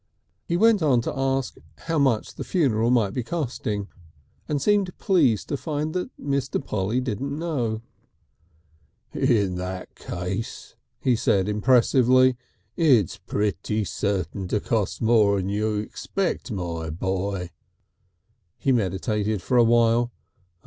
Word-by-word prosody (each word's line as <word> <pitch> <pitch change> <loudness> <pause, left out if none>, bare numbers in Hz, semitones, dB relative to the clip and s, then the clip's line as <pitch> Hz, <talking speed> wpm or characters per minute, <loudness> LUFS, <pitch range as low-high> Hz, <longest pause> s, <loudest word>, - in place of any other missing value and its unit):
He 170 - +1
went 225 0 +4
on 140 -6 +4
to 130 - -4
ask 135 -1 -1 0.2
how 165 -2 -1
much 130 -6 +1
the - - -6
funeral 120 - +1
might 115 -6 +2
be 125 - -1
costing, 120 - -3 0.6
and 150 -2 0
seemed 200 +2 +1
pleased 145 - +2
to 145 - -1
find 150 +3 -3 0.3
Mr. 140 -1 -2
Polly 105 +4 -1
didn't 130 +3 -3
know. 125 -10 -2 1.3
"In 105 -9 +1
that 90 0 -5
case," 90 +5 -5 0.3
he 125 -2 +3
said 95 -3 +1
impressively, 130 +3 +4 0.4
"it's 130 - +3
pretty 105 +1 -1
certain 95 -2 -2
to 105 - 0
cost 110 0 -1
more'n 100 -4 +3
you 105 +1 0
expect, 155 - -3
my 85 -5 -4
boy." 95 +2 -2 1.1
He 135 - +1
meditated 105 -1 0
for 125 +4 +2
a - - +7
time. 120 0 +4
115 Hz, 120 wpm, -24 LUFS, 100-135 Hz, 1.3 s, a